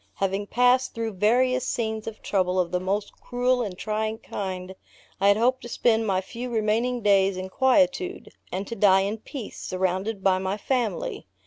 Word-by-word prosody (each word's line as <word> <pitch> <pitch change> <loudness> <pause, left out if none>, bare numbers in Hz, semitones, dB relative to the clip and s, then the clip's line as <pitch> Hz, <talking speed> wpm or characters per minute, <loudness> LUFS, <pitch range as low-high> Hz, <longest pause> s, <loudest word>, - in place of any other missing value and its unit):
Having 195 +1 -1
passed 250 +2 +3
through 225 -1 -3
various 250 +6 +2
scenes 220 -2 -2
of 220 -1 -7
trouble 185 -2 +1
of 175 -2 0
the 180 - +1
most 200 +3 -2
cruel 250 0 +1
and 200 -6 -4
trying 215 +1 -2
kind, 185 -3 -5 0.5
I 195 - +3
had 200 0 +5
hoped 250 +3 +2
to 240 - -8
spend 225 -1 +2
my 190 -2 +1
few 240 +6 -6
remaining 230 +2 0
days 195 -2 +3
in 185 0 -5
quietude, 275 - +1 0.2
and 190 +2 -3
to 230 - -6
die 195 -2 +5
in 205 +3 -2
peace, 240 0 -8
surrounded 190 +3 -2
by 185 -1 +3
my 190 +2 -2
family. 270 - -2
215 Hz, 180 wpm, -25 LUFS, 190-245 Hz, 0.5 s, had